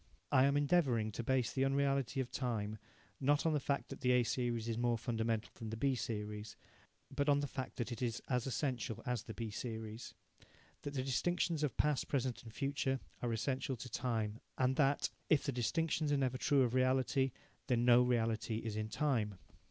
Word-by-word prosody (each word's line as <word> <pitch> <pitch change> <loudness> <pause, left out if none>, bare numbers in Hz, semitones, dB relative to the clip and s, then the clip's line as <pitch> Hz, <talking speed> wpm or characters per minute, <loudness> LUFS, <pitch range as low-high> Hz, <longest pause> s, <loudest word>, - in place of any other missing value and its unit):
I 130 - +6
am 140 +1 +3
endevouring 140 -8 +2
to 110 - -4
base 130 0 +1
the 135 - +1
unreality 135 -1 +1
of 125 - -5
time, 110 -5 -2 0.4
not 145 +3 +2
on 160 - +3
the 150 - +2
fact 140 +1 -1
that 135 - -8
the 125 0 +3
A 125 -1 +5
series 120 -1 -1
is 115 - -1
more 120 0 +1
fundamental 115 -1 -1
than 115 -2 -5
the 110 - -4
B 135 +3 +2
series, 105 -3 -4 0.6
but 145 +1 +1
on 145 0 +5
the 145 - 0
fact 130 -1 -5
that 120 0 -3
it 120 - -5
is 120 -2 -1
as 125 -1 0
essential 130 -4 -2
as 125 -3 -1
the 110 -1 -8
B 115 -2 -4
series 110 0 -6 0.7
that 145 0 -5
the 130 - 0
distinctions 165 +4 0
of 150 -3 -1
past, 150 -2 +2
present 130 -3 -1
and 115 - -11
future 135 +1 -1 0.2
are 120 - 0
essential 130 +3 -1
to 125 +1 -8
time 115 -3 -1 0.2
and 130 0 +2
that, 140 -1 +2 0.2
if 155 - +4
the 140 - 0
distinctions 150 +5 0
are 145 - +3
never 130 -2 0
true 140 -1 +4
of 120 -1 0
reality, 130 +1 +2 0.4
then 120 -1 +2
no 120 0 +7
reality 115 -2 +1
is 110 -1 -3
in 110 0 -2
time. 110 -8 0
125 Hz, 200 wpm, -36 LUFS, 115-140 Hz, 0.7 s, no